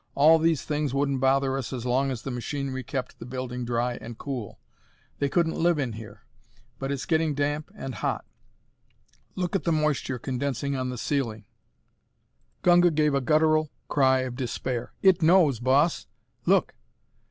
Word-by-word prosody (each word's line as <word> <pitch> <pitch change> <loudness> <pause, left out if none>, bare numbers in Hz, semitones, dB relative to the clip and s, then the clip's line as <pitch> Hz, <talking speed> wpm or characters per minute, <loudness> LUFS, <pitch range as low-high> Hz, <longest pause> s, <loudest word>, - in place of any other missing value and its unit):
"All 160 +3 +6
these 160 -3 +2
things 150 -3 -2
wouldn't 140 -1 +1
bother 135 0 +2
us 130 -3 -4
as 125 -2 -5
long 130 +2 +1
as 125 -4 -4
the 135 - -4
machinery 130 +1 -4
kept 130 0 -5
the - - -8
building 125 -1 -4
dry 120 +1 -1
and 115 0 -8
cool. 130 -7 -6 0.6
They 140 - +1
couldn't 165 +1 +1
live 170 -1 +3
in 130 -6 -2
here. 110 -1 -10 0.6
But 135 +1 -3
it's 140 -2 -3
getting 160 -2 +1
damp 145 +3 -1
and 135 -10 -6
hot. - - -2 1.1
Look 180 +1 -2
at 195 - 0
the 170 - +1
moisture 150 -4 0
condensing 135 +2 -2
on 130 -1 -2
the 125 - -5
ceiling!" 115 -5 -2 1.2
Gunga 175 0 +6
gave 150 -2 +2
a 140 - +2
guttural 155 +2 +3 0.2
cry 130 -2 +3
of 130 -1 -4
despair. 125 -1 -3
"It 190 -3 +5
knows, 160 -7 +5
Boss; 135 +7 +2 0.4
look!" - - +3
135 Hz, 165 wpm, -26 LUFS, 125-155 Hz, 1.2 s, All